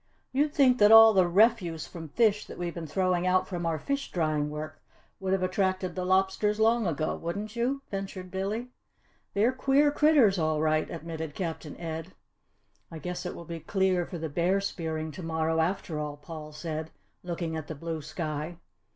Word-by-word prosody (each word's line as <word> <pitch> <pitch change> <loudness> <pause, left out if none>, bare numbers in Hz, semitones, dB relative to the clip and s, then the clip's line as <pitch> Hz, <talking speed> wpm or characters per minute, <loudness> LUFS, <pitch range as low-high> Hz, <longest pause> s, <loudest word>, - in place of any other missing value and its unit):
"You'd 290 +3 +2
think 265 -4 +4
that 210 0 +7
all 225 0 +10
the 185 -3 +4
refuse 180 -4 +3
from 165 -2 -8
fish 210 +3 +2
that - - -9
we've 175 -1 -3
been 165 -2 -6
throwing 185 +2 +1
out 185 0 +3
from 175 -3 -3
our 165 -1 0
fish 280 - -3
drying 155 -3 0
work 155 +1 -7 0.4
would 190 -1 -2
have 190 -1 +1
attracted 185 -1 0
the 185 0 -3
lobsters 190 +3 +2
long 225 -1 +3
ago, 155 -1 -1
wouldn't 205 +6 -5
you?" 260 +4 -1
ventured 195 -2 -5
Billy. 210 +6 -3 0.6
"They're 215 +5 +4
queer 275 +3 +3
critters, 285 - +4
all 155 -1 +1
right," 155 0 +1
admitted 160 -2 -6
Captain 165 -4 -5
Ed. 165 +1 -6 0.8
"I 165 - -8
guess 180 +2 -5
it - - -5
will 170 - -9
be 165 0 -6
clear 185 -1 +1
for 175 - -6
the 160 0 -3
bear 175 +6 +1
spearing 160 -5 -3
to 185 - -8
morrow, 160 -1 0
after 160 -2 -1
all," 150 -1 -4
Paul 155 0 -9
said, 155 +1 -5 0.3
looking 170 -2 -4
at 155 -2 -5
the 160 - -5
blue 160 +1 -4
sky. 155 +1 -4
175 Hz, 185 wpm, -28 LUFS, 160-200 Hz, 0.8 s, all